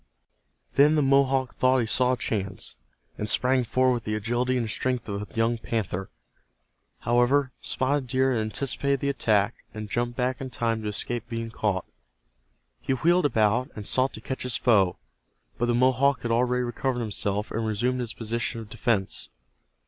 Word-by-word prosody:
Then 145 +3 +6
the 150 - +3
Mohawk 135 -1 +2
thought 130 +1 +4
he 120 - +1
saw 125 +3 +3
a - - -1
chance, 100 -5 -3 0.4
and 105 - -1
sprang 125 +2 +2
forward 130 +2 +2
with 120 -2 -3
the 105 0 -2
agility 120 +4 0
and 115 -2 -1
strength 125 +2 -1
of 100 -1 -3
a - - -21
young 115 +1 +1
panther. 95 -5 -3 0.9
However, 125 +3 +2
Spotted 130 0 0
Deer 130 +1 +2
had 115 - 0
anticipated 140 +5 -1
the 140 - -1
attack, 110 -5 +1
and 110 -1 -6
jumped 120 0 -1
back 125 0 -1
in 130 - -4
time 115 -1 -1
to 105 - -4
escape 120 +3 -3
being 115 -1 -4
caught. 100 -5 -1 1.0
He 135 - 0
wheeled 170 +5 +3
about, 115 +2 +1
and 105 -2 -6
sought 130 +1 +2
to 110 - -7
catch 130 +2 -5
his 125 -2 0
foe, 100 -7 +3 0.6
but 120 - +1
the 120 - +2
Mohawk 130 +2 +3
had 120 - -1
already 125 +1 +2
recovered 120 +1 -2
himself 105 -1 -1
and 115 - -2
resumed 125 +4 0
his 120 -2 -3
position 115 0 -2
of 110 -1 -10
defense. 110 -4 -1
120 Hz, 175 wpm, -26 LUFS, 110-130 Hz, 1.0 s, Then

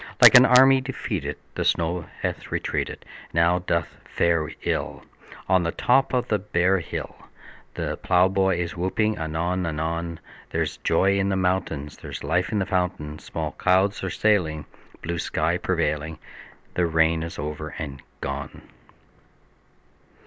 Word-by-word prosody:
Like - - +9
an 125 +1 +9
army 130 +1 +7
defeated 100 - -4 0.2
The - - -2
snow 85 0 0
hath - - -3
retreated, - - -3 0.2
And - - -26
now 85 +2 +4
doth 85 -1 -2
fare 85 -3 +1
ill - - -2 0.4
On 95 -1 +4
the 85 -1 -1
top 135 +8 +2
of 125 0 0
the 105 - +1
bare 95 -1 +1
hill; 80 - -6 0.6
The - - -3
plowboy 95 0 +2
is 85 -1 -3
whooping 95 +3 0
anon 85 +3 -1
anon: 85 +1 -3 0.3
There's - - -2
joy 100 +1 +2
in 95 0 +1
the 95 - +1
mountains; 90 -6 -1
There's - - -8
life 90 +2 0
in 110 - 0
the 95 - +1
fountains; 90 -5 -2
Small 80 -2 -3
clouds 95 +6 +1
are 95 - -1
sailing, 85 -8 +1 0.4
Blue 85 0 -3
sky - - 0
prevailing; 75 +1 -1 0.6
The 90 -1 +1
rain 80 0 +2
is 85 +1 -6
over 75 +1 -5
and 70 -5 -6 0.2
gone! 70 0 -5
85 Hz, 145 wpm, -24 LUFS, 80-95 Hz, 0.6 s, Like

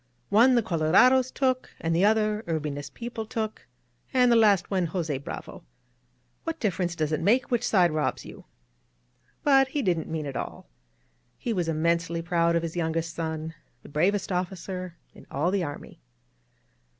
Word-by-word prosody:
One 235 +5 +5
the 235 - +3
colorados 225 +9 +4
took, 255 -1 0
and 165 0 -1
the 180 +4 +4
other 215 0 +2
Urbina's 150 -3 -3
people 230 +5 -6
took, 220 - -4 0.4
and 250 -2 +4
the - - +6
last 205 -5 +4
one 185 -3 +1
Jos£ 160 -5 -3
Bravo. - - -7
• - - -13
•. - - -29 0.8
What 330 0 -4
difference 180 -5 -1
does 155 -2 -1
it 155 - 0
make 245 +6 +2
which 240 -1 +1
side 180 -7 +3
robs 150 -5 -1
you?" - - -12 1.0
But 270 -2 +5
he 275 +1 -2
didn't 175 -5 0
mean 160 -2 -3
it 140 -2 -6
all. - - -6 0.7
He 235 - -2
was 175 -5 -1
inmiensely 165 +1 0
proud 170 -1 +2
of 170 - +1
his 165 0 -4
youngest 165 -1 -1
son, 160 -1 -4 0.3
the - - -12
bravest 190 +7 +1
officer 180 0 -4 0.2
in - - -16
all 155 +6 0
the 195 -2 0
army. 145 - -8
175 Hz, 170 wpm, -26 LUFS, 160-220 Hz, 1.0 s, the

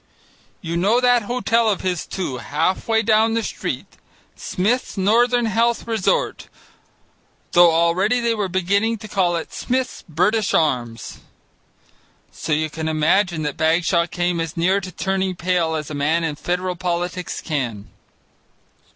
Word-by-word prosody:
You 170 -1 -3
know 205 +7 +3
that 245 -1 +4
hotel 230 0 +1
of 200 - -1
his, 180 -3 -2
too, 175 -9 -4
half 155 +9 -1
way 225 0 +2
down 220 +1 +3
the 230 - 0
street, - - -4 0.5
Smith's 220 +6 -1
Northern 240 +5 +3
Health 230 +2 +1
Resort, 230 - -1 1.0
though 175 -1 +6
already 175 +8 +2
they 235 -1 +1
were 210 -3 -1
beginning 200 +5 0
to 215 0 -10
call 185 -4 +1
it 165 - -5
Smith's 255 0 -2
British 200 +7 +1
Arms. 120 - -1 1.1
So 155 - -6
you 155 +1 +1
can 160 0 -4
imagine 160 +2 +1
that 150 -2 -3
Bagshaw 165 +2 +2
came 175 0 -1
as 165 -1 -4
near 185 +4 +2
to 185 -1 -7
turning 190 +1 -1
pale 170 -2 0
as 155 -1 -4
a - - -4
man 155 +4 +1
in 160 -2 -1
federal 180 +3 -2
politics 180 0 -3
can. 120 -10 -3
180 Hz, 145 wpm, -21 LUFS, 165-220 Hz, 1.1 s, though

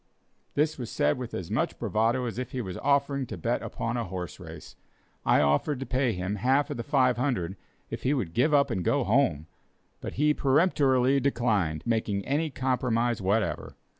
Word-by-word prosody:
This 150 0 +1
was 120 - -5
said 75 +10 +1
with 125 -2 -5
as 90 +1 -5
much 110 - -1
bravado 115 +3 0
as 120 0 -4
if 125 - -5
he 130 - -2
was 95 -5 -6
offering 140 -2 +1
to 110 - -6
bet 85 - -1
upon 115 +1 -3
a 120 - -1
horse 90 -4 -6
race. - - -10 0.5
I - - +5
offered 75 - +1
to 135 - -4
pay 130 -1 +1
him 95 +3 -3
half 135 +6 +2
of - - -4
the 115 - -3
$500 125 - +1 0.4
if - - -5
he 140 +3 +1
would 95 -11 -3
give 130 +7 +2
up 140 -2 +3
and 95 -5 -1
go 140 +7 +2
home; 100 - +2 0.5
but - - -6
he 150 +2 +2
peremptorily 135 -3 +3
declined 110 - 0
making 110 -4 -1
any 150 +4 0
compromise 120 -4 0
whatever. 100 +3 -1
125 Hz, 185 wpm, -27 LUFS, 100-140 Hz, 0.5 s, I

